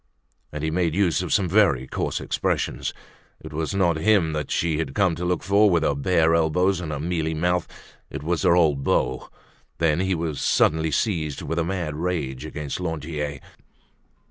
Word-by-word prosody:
And 75 0 -5
he 80 - 0
made 85 -1 0
use 95 -3 +2
of 90 - -4
some 95 -3 +2
very 85 - +3
coarse - - -3
expressions. - - -2 0.5
It - - -10
was 80 +5 -2
not 85 -4 +2
him 85 -2 +2
that 75 -1 -3
she 80 -2 0
had 70 -5 -3
come 95 -4 +3
to 85 - -5
look 90 -1 -1
for 100 +2 +4
with 85 -3 +2
her 75 - +2
bare 80 +3 +2
elbows 85 +3 +2
and 80 -3 -5
her 75 - -3
mealy 80 0 -1
mouth; 90 +2 0 0.4
it - - -7
was 85 +1 -1
her 90 -3 +4
old 75 -6 +2
beau. 65 -1 0 0.5
Then 80 -1 +2
he 95 0 +1
was 80 -3 -3
suddenly 80 +1 +2
seized 80 -2 -1
with 80 - -2
a - - +2
mad 85 -3 -3
rage 75 -5 -3
against 75 -1 -5
Lantier. 75 -4 -4
80 Hz, 185 wpm, -24 LUFS, 75-90 Hz, 0.5 s, for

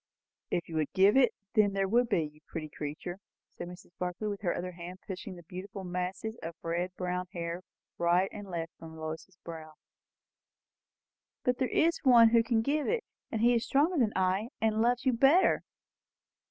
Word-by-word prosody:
"If 175 - -1
you 165 - -4
could 155 -2 0
give 195 +4 +5
it, 265 -2 +6 0.2
there 200 -2 +3
would 235 +4 +3
be, 180 -7 +2
you 150 0 -9
pretty 155 -2 -5
creature!" 155 +5 -6 0.4
said - - -6
Mrs. 180 0 -12
Barclay, 180 +4 -2
with 200 -1 -4
her 180 -4 +1
other 180 +1 -3
hand 175 +1 -8
pushing 190 -1 -6
the 175 - -12
beautiful 190 +2 -7
masses 180 +5 -3
of 165 0 -6
red 175 +2 -1
brown 180 0 -2
hair 170 0 -3 0.4
right 175 +2 +3
and 205 -2 -8
left 165 -2 -4
from 160 -1 -10
Lois's 160 +3 -6
brow. 160 -2 -8 1.7
"But 250 0 +1
there 260 - +2
is 330 +5 +2
One 240 -4 +7
who 230 0 +5
can 225 -1 +1
give 290 +4 0
it, 470 -1 0 0.3
who 230 +1 +3
is 235 -1 +2
stronger 300 +4 +3
than 220 -4 +2
I, 190 +4 +1
and 220 0 +2
loves 245 +2 +2
you 260 - +4
better." 275 +10 +5
190 Hz, 180 wpm, -31 LUFS, 175-230 Hz, 1.7 s, One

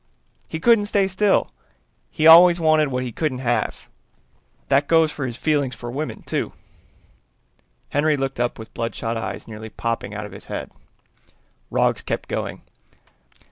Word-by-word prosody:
He 160 - -5
couldn't 220 +1 +4
stay 200 -2 +2
still, 195 +1 +1 0.6
he 155 - -1
always 170 +2 +9
wanted 155 -2 +3
what 125 -1 -2
he 125 - -4
couldn't 145 +1 -2
have. 120 -2 -2 0.8
That 140 +1 +2
goes 160 -2 +4
for 140 -3 -4
his 120 -1 -6
feelings 145 -4 0
for 120 0 -7
women, 150 +5 -5
too." - - -3 1.4
Henry 150 +1 +2
looked 135 -2 -3
up 120 0 -1
with 110 - -11
bloodshot 115 0 -3
eyes 115 - -5
nearly 110 0 -8
popping 115 -2 -4
out 105 0 -5
of 105 - -10
his 95 - -11
head. - - -6 1.0
Roggs - - +1
kept - - -4
going. - - -4
140 Hz, 150 wpm, -22 LUFS, 115-160 Hz, 1.4 s, always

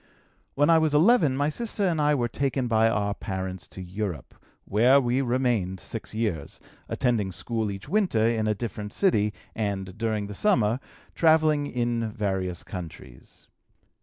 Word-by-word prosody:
"When 145 +3 +4
I 165 - +6
was 155 -2 +1
11 160 - +4
my 145 +1 +1
sister 215 +4 -3
and 165 -4 +1
I 150 0 +3
were 120 -3 0
taken 135 +1 -1
by 115 -1 +3
our 100 -2 0
parents 95 -3 -5
to 95 - -9
Europe, 95 -3 -5 0.3
where 120 +7 +5
we 125 0 +1
remained 120 -7 0
six - - -7
years, 105 -10 -3 0.3
attending 115 -6 0
school 110 +4 -2
each 100 +3 -7
winter 180 - +2
in 115 -2 +1
a 105 - +1
different 105 -2 -5
city 105 - +2 0.2
and, 95 -3 -3
during 110 -3 -1
the 105 - -7
summer, 120 - +2 0.3
travelling 155 -3 +3
in 120 -3 -1
various 95 -4 -2
countries. 80 -9 -10
115 Hz, 155 wpm, -26 LUFS, 100-140 Hz, 0.3 s, I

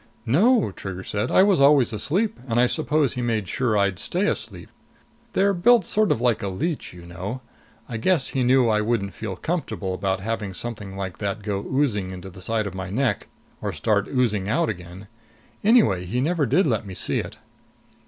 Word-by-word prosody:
"No," 200 - +3
Trigger 95 -1 -7
said. 105 +1 -2
"I 185 - +5
was 195 -7 +3
always 140 -4 +5
asleep, 175 - -1
and 120 -1 +1
I 125 - +6
suppose 150 0 +1
he 125 - -3
made 110 -5 -1
sure 115 +1 0
I'd 100 -3 +1
stay 185 +4 0
asleep. 105 - -4 0.6
They're 200 +1 +3
built 215 +3 +4
sort 215 +1 +2
of - - +1
like 120 -2 +1
a 100 - -2
leech, 145 - -3
you 90 -1 -12
know. 95 +8 -6 0.5
I 115 - -4
guess 145 +4 +1
he 130 - 0
knew 125 0 +4
I 105 -1 +2
wouldn't 105 -4 -1
feel 100 -1 -5
comfortable 135 - -3
about 95 0 -1
having 105 -2 -4
something 105 -2 -6
like 95 -2 -5
that 100 +1 -3
go 100 -1 -2
oozing 120 -9 0
into 95 0 -8
the 95 - -12
side 110 +2 -1
of 100 - -5
my 95 -1 -5
neck 125 +6 -1 0.3
or - - -2
start 100 -2 0
oozing 105 -7 0
out 160 +8 +1
again. 90 0 -8 0.6
Anyway, 200 - +4
he 115 +8 -2
never 155 +1 +1
did 180 - +3
let 115 -7 0
me 95 -3 -8
see - - +1
it." - - -6
115 Hz, 195 wpm, -24 LUFS, 100-140 Hz, 0.6 s, I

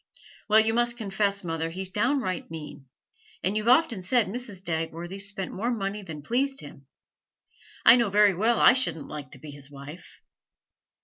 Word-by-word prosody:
'Well, 215 +1 +7
you 220 +1 0
must 240 0 +2
confess, 200 -2 -1
mother, 165 -1 -3
he's 185 +2 -4
downright 230 -2 -1
mean; 150 -4 -9 0.6
and 190 +3 0
you've 215 +1 -2
often 245 -4 +4
enough 180 - -10
said 245 -1 +3
Mrs. 210 -4 -4
Dagworthy 165 +3 -4
spent 195 -2 -4
more 225 +5 -2
money 210 -3 -3
than 160 -6 -9
pleased 270 - 0
him. - - -13 1.0
I - - +9
know 235 -4 +1
very 205 0 +5
well 220 +6 +1
I - - +7
shouldn't 255 - -2
like 145 -3 -7
to - - -10
be 150 +2 -10
his 140 0 -10
wife.' 145 +4 -12
195 Hz, 175 wpm, -26 LUFS, 165-230 Hz, 1.0 s, I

